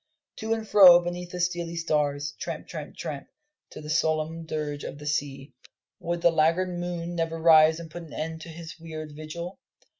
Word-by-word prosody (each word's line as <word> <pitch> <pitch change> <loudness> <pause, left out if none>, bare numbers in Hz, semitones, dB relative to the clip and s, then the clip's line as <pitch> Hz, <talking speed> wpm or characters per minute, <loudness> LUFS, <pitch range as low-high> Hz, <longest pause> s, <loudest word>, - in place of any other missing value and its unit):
To 220 0 -4
and 220 -1 -6
fro 185 -5 +9
beneath 175 0 -5
the 180 - -6
steely 175 -1 -1
stars 145 -3 0
tramp, - - -5
tramp, - - -7
tramp, - - -5 0.4
to - - -10
the 150 - -9
solemn 160 +1 0
dirge 150 -2 -3
of 140 - -6
the 150 - -10
sea. 140 -2 -3 0.5
Would 170 0 -3
the 170 - +5
laggard 165 +4 +2
moon 175 -1 -4
never 165 -1 -2
rise 160 0 +6
and 165 -2 -9
put 175 - -7
an 165 - -12
end 160 +1 -4
to 165 - -9
his 165 0 -9
weird 155 -2 -7
vigil? 170 +5 -7
165 Hz, 185 wpm, -27 LUFS, 155-175 Hz, 0.5 s, fro